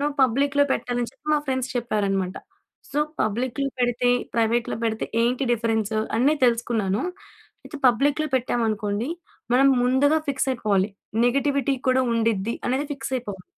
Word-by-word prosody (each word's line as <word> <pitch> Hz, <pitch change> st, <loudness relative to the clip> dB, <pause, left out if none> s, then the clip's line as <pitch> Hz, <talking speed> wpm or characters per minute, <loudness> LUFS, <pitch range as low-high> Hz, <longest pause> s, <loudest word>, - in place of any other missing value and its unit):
నువ్వు 290 Hz, 0 st, -1 dB
పబ్లిక్‌లో 275 Hz, +3 st, +3 dB
పెట్టాలని 245 Hz, -1 st, -2 dB
చెప్పి 300 Hz, -, -33 dB
మా -, -, +3 dB
ఫ్రెండ్స్ 260 Hz, -1 st, -1 dB
చెప్పారన్నమాట. 200 Hz, -5 st, -1 dB, 0.6 s
సో 290 Hz, -, 0 dB, 0.2 s
పబ్లిక్‌లో 255 Hz, +5 st, -1 dB
పెడితే 245 Hz, 0 st, +1 dB, 0.3 s
ప్రైవేట్‌లో 230 Hz, 0 st, +1 dB
పెడితే 220 Hz, -1 st, -2 dB, 0.2 s
ఏంటి 250 Hz, +3 st, +1 dB
డిఫరెన్స్ 220 Hz, -2 st, 0 dB, 0.2 s
అన్ని 285 Hz, +5 st, +4 dB
తెలుసుకున్నాను. 225 Hz, -4 st, 0 dB, 0.6 s
అయితే 300 Hz, -, -8 dB
పబ్లిక్‌లో 290 Hz, +6 st, +1 dB
పెట్టాం 245 Hz, -1 st, -1 dB
అనుకోండి 215 Hz, +2 st, -2 dB, 0.4 s
మనం 270 Hz, +2 st, +5 dB, 0.2 s
ముందుగా 280 Hz, +5 st, +3 dB
ఫిక్స్ 270 Hz, 0 st, 0 dB
అయిపోవాలి. 210 Hz, -5 st, +1 dB, 0.4 s
నెగెటివిటీ 275 Hz, +1 st, +1 dB
కూడా 255 Hz, 0 st, +4 dB
ఉండిద్ది 225 Hz, -1 st, 0 dB
అనేది 265 Hz, +4 st, 0 dB
ఫిక్స్ 270 Hz, -1 st, -6 dB
అయిపోవాలి. 205 Hz, -7 st, -5 dB
245 Hz, 135 wpm, -24 LUFS, 220-270 Hz, 0.6 s, మనం